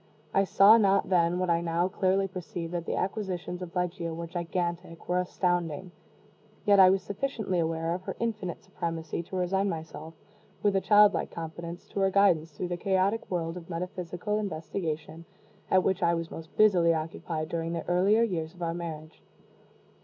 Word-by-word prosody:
I 195 Hz, -, +3 dB
saw 205 Hz, +4 st, +7 dB
not 200 Hz, -2 st, +3 dB
then 175 Hz, -1 st, +3 dB
what 180 Hz, -1 st, +1 dB
I 170 Hz, 0 st, +2 dB
now 170 Hz, +1 st, +1 dB
clearly 190 Hz, +1 st, +1 dB
perceive 175 Hz, -2 st, -6 dB
that 175 Hz, -1 st, -4 dB
the -, -, -1 dB
acquisitions 185 Hz, -3 st, -3 dB
of 180 Hz, 0 st, -7 dB
Ligeia 175 Hz, -2 st, -2 dB
were 170 Hz, +1 st, -5 dB
gigantic, 170 Hz, 0 st, -4 dB
were 180 Hz, 0 st, +1 dB
astounding; 175 Hz, -1 st, -1 dB, 0.7 s
yet 200 Hz, -2 st, +5 dB
I 185 Hz, -1 st, +9 dB
was 190 Hz, 0 st, +2 dB
sufficiently 205 Hz, -3 st, -2 dB
aware 165 Hz, 0 st, -1 dB
of 180 Hz, -, -4 dB
her -, -, -4 dB
infinite 215 Hz, -6 st, -3 dB
supremacy 165 Hz, -1 st, -4 dB
to 170 Hz, -, -9 dB
resign 190 Hz, +2 st, +1 dB
myself, 160 Hz, -1 st, -7 dB, 0.5 s
with 205 Hz, -1 st, +3 dB
a 195 Hz, -, +3 dB
child 210 Hz, 0 st, +6 dB
like -, -, -2 dB
confidence, 170 Hz, +1 st, -7 dB
to -, -, -4 dB
her 195 Hz, 0 st, +3 dB
guidance 185 Hz, -5 st, +3 dB
through 170 Hz, +4 st, -5 dB
the 175 Hz, -, -2 dB
chaotic 195 Hz, +3 st, 0 dB
world 165 Hz, -1 st, -2 dB
of 170 Hz, -1 st, -10 dB
metaphysical 180 Hz, +3 st, -3 dB
investigation 160 Hz, -3 st, -4 dB, 0.5 s
at 185 Hz, -1 st, +4 dB
which 190 Hz, 0 st, 0 dB
I 170 Hz, -1 st, +3 dB
was 165 Hz, 0 st, -4 dB
most 160 Hz, 0 st, -10 dB
busily 175 Hz, -6 st, +5 dB
occupied 155 Hz, 0 st, -4 dB
during 165 Hz, 0 st, -2 dB
the 165 Hz, -, -4 dB
earlier 195 Hz, +6 st, +4 dB
years 170 Hz, -6 st, -2 dB
of 175 Hz, -, -7 dB
our 165 Hz, 0 st, -1 dB
marriage. 160 Hz, -2 st, -7 dB
175 Hz, 175 wpm, -28 LUFS, 165-195 Hz, 0.7 s, I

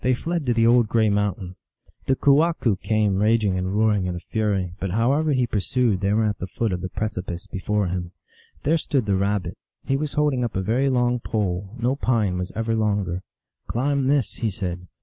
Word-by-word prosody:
They 130 Hz, 0 st, +3 dB
fled 165 Hz, +1 st, -3 dB
to 120 Hz, -, +3 dB
the 115 Hz, -1 st, +3 dB
old 120 Hz, -1 st, +5 dB
gray 110 Hz, -2 st, +3 dB
mountain. 100 Hz, -3 st, -2 dB, 0.5 s
The 135 Hz, -, +3 dB
kewahqu 140 Hz, -, +3 dB
came 105 Hz, -3 st, +1 dB
raging 105 Hz, -3 st, +2 dB
and 95 Hz, 0 st, -2 dB
roaring 105 Hz, -4 st, +2 dB
in 90 Hz, -, -3 dB
a -, -, -4 dB
fury, 100 Hz, -2 st, -1 dB
but 95 Hz, -, -2 dB
however 135 Hz, -, +2 dB
he 130 Hz, -3 st, +2 dB
pur 110 Hz, -3 st, -1 dB
sued 115 Hz, -2 st, +1 dB
they 100 Hz, 0 st, +1 dB
were 110 Hz, +2 st, +2 dB
at 105 Hz, -1 st, -1 dB
the 90 Hz, -, -4 dB
foot 110 Hz, +3 st, -2 dB
of 90 Hz, -, -3 dB
the 95 Hz, -, -4 dB
precipice 90 Hz, -4 st, -4 dB
before 105 Hz, +2 st, -1 dB
him. 90 Hz, -1 st, -3 dB, 0.5 s
There 160 Hz, +3 st, +2 dB
stood 135 Hz, -6 st, 0 dB
the 100 Hz, -, +1 dB
Rabbit. 100 Hz, 0 st, -1 dB, 0.3 s
He 135 Hz, -, +1 dB
was 150 Hz, 0 st, -3 dB
holding 145 Hz, -4 st, +1 dB
up 120 Hz, -, -3 dB
a 95 Hz, -, 0 dB
very 125 Hz, +7 st, +1 dB
long 125 Hz, -1 st, +1 dB
pole; 100 Hz, -2 st, -2 dB
no 125 Hz, +3 st, +1 dB
pine 110 Hz, -9 st, 0 dB
was 90 Hz, 0 st, -4 dB
ever 115 Hz, 0 st, 0 dB
longer. 100 Hz, -5 st, 0 dB, 0.2 s
" -, -, -55 dB
Climb 135 Hz, +2 st, 0 dB
this," 140 Hz, -3 st, +1 dB
he 115 Hz, -, 0 dB
said. 90 Hz, -3 st, -5 dB
110 Hz, 210 wpm, -23 LUFS, 95-125 Hz, 0.5 s, old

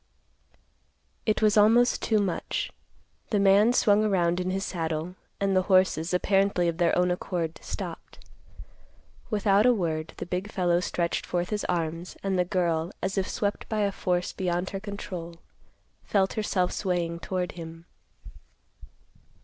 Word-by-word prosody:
It 215 Hz, 0 st, +1 dB
was 215 Hz, 0 st, +4 dB
almost 230 Hz, +4 st, +5 dB
too 220 Hz, -, +2 dB
much. 200 Hz, -4 st, -1 dB, 0.6 s
The 210 Hz, -, +1 dB
man 200 Hz, +3 st, +5 dB
swung 215 Hz, -4 st, +4 dB
around 180 Hz, -4 st, +2 dB
in 180 Hz, 0 st, -1 dB
his 195 Hz, +1 st, -2 dB
saddle, 165 Hz, 0 st, -3 dB, 0.3 s
and 195 Hz, -1 st, +1 dB
the 185 Hz, -, +4 dB
horses, 185 Hz, -3 st, +3 dB
apparently 195 Hz, -1 st, +2 dB
of 165 Hz, 0 st, -2 dB
their 170 Hz, -1 st, +3 dB
own 180 Hz, 0 st, +3 dB
accord, 175 Hz, -2 st, -3 dB
stopped. -, -, -7 dB, 1.1 s
Without 205 Hz, +1 st, +3 dB
a 250 Hz, -, +5 dB
word, 160 Hz, -5 st, -2 dB
the -, -, -5 dB
big 185 Hz, +4 st, -4 dB
fellow 175 Hz, -3 st, +2 dB
stretched 170 Hz, 0 st, -1 dB
forth 175 Hz, +1 st, -2 dB
his 210 Hz, -1 st, -1 dB
arms, 170 Hz, 0 st, -3 dB
and 195 Hz, -1 st, 0 dB
the -, -, +4 dB
girl, 170 Hz, -2 st, 0 dB
as 190 Hz, 0 st, -1 dB
if 195 Hz, -2 st, -1 dB
swept 205 Hz, -1 st, -2 dB
by 215 Hz, -1 st, 0 dB
a 200 Hz, -1 st, +1 dB
force 180 Hz, -2 st, -1 dB
beyond 180 Hz, -1 st, -2 dB
her 195 Hz, -, -4 dB
control, 190 Hz, -4 st, -7 dB, 0.7 s
felt 195 Hz, -2 st, +1 dB
herself 190 Hz, -4 st, 0 dB
swaying 175 Hz, -3 st, -2 dB
toward 180 Hz, 0 st, -3 dB
him. 165 Hz, -1 st, -9 dB
185 Hz, 150 wpm, -27 LUFS, 175-200 Hz, 1.1 s, almost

